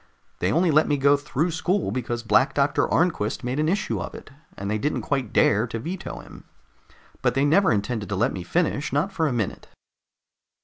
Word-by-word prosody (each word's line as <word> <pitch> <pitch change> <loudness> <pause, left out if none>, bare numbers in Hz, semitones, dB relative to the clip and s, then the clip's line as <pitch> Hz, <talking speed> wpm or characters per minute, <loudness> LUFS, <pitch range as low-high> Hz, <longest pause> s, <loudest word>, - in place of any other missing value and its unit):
They 90 - +1
only 170 - +3
let 155 +1 +4
me 145 - +1
go 140 +1 +4
through 150 +3 -1
school 180 +5 0
because 120 -2 -3
Black 130 +4 +3
Doctor 140 0 +1
Arnquist 165 -11 0
made 125 +4 -2
an 155 +1 +1
issue 200 +4 -1
of - - -6
it, 225 -9 -11 0.3
and 100 - -5
they 110 +1 -1
didn't 150 +7 -1
quite 135 -6 -2
dare 105 +4 +3
to 115 - -5
veto 170 +11 -6
him. - - -14 0.8
But 125 0 +1
they 135 +1 +2
never 185 +5 +4
intended 105 0 -2
to 100 - -1
let 95 - +1
me 95 - -5
finish, 155 - -1
not 150 +8 0
for 165 -4 0
a - - -1
minute." 115 -5 -3
140 Hz, 205 wpm, -24 LUFS, 115-160 Hz, 0.8 s, let